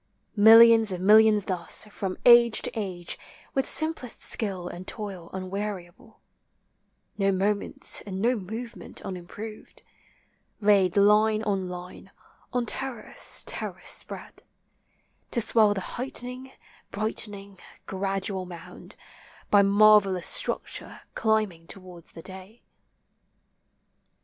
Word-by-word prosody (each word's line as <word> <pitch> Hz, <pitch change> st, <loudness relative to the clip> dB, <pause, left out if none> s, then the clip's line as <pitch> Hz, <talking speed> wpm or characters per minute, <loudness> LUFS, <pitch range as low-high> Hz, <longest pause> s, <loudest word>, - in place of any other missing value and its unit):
397 205 Hz, -, -1 dB
Millions 225 Hz, -1 st, +8 dB
of 180 Hz, -, -4 dB
millions 210 Hz, +1 st, +5 dB
thus, 180 Hz, +2 st, -1 dB
from 195 Hz, -2 st, -5 dB
age 235 Hz, -1 st, +6 dB
to -, -, +1 dB
age, 185 Hz, -5 st, -5 dB, 0.3 s
With 270 Hz, -, 0 dB
simplest 315 Hz, -7 st, 0 dB
skill 190 Hz, -6 st, -1 dB
and 180 Hz, +1 st, -9 dB
toil 195 Hz, -6 st, -7 dB
unweariable, 195 Hz, +3 st, -7 dB, 1.0 s
No 195 Hz, 0 st, +2 dB
moment 200 Hz, +2 st, -1 dB
and 190 Hz, -1 st, -5 dB
no 240 Hz, +5 st, +2 dB
movement 225 Hz, +4 st, -7 dB
unimproved, 195 Hz, +4 st, -9 dB, 0.8 s
Laid 200 Hz, -3 st, +3 dB
line 215 Hz, +2 st, +4 dB
on 195 Hz, -4 st, -2 dB
line, 180 Hz, +1 st, -9 dB, 0.4 s
on 245 Hz, -1 st, -1 dB
terrace 260 Hz, +1 st, -1 dB
terrace -, -, -5 dB
spread, -, -, -6 dB, 0.9 s
To -, -, -2 dB
swell 215 Hz, -2 st, +3 dB
the 195 Hz, -, -3 dB
heightening, 250 Hz, +3 st, -6 dB, 0.4 s
brightening, 200 Hz, -2 st, -5 dB, 0.3 s
gradual 195 Hz, 0 st, -3 dB
mound, 170 Hz, -2 st, -12 dB, 0.6 s
By 205 Hz, -, +6 dB
marvel 200 Hz, -1 st, +5 dB
Ions 180 Hz, -, -5 dB
structure -, -, -2 dB
climbing 215 Hz, -7 st, -1 dB
towards 180 Hz, -3 st, -12 dB
the 165 Hz, -, -11 dB
day. 190 Hz, +4 st, -10 dB
205 Hz, 110 wpm, -26 LUFS, 185-220 Hz, 1.0 s, Millions